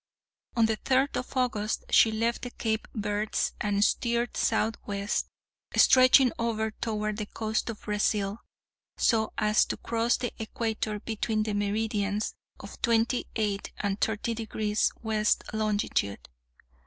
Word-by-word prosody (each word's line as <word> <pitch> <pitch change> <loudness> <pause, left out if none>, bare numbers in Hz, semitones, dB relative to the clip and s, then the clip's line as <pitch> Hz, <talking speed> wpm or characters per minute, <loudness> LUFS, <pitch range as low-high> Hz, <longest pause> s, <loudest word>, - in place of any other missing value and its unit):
On 230 -1 +4
the 220 -1 0
third 265 +4 +1
of 255 +1 -4
August, 220 -4 0
she 225 - +6
left 230 +2 0
the 245 - -5
Cape 220 -2 -2
Verds 210 0 -1
and 205 -1 +2
steered 235 +1 0
southwest, 205 -2 -1 0.5
stretching 255 0 +7
over 220 -1 0
toward 215 -1 -3
the 210 -1 -4
coast 220 +1 -2
of 225 - -6
Brazil, 210 0 0 0.6
so 220 -2 +2
as 215 0 +4
to - - -4
cross 230 +1 0
the 245 -1 -3
equator 220 -1 -2
between 220 0 -1
the 215 -1 -2
meridians 205 0 -1 0.3
of - - -11
twenty 230 +1 +2
eight 205 -3 -1
and 200 0 -2
thirty 220 +2 0
degrees 215 -1 0
west 215 -1 +1
longitude. 205 - -1
220 Hz, 130 wpm, -28 LUFS, 210-230 Hz, 0.6 s, stretching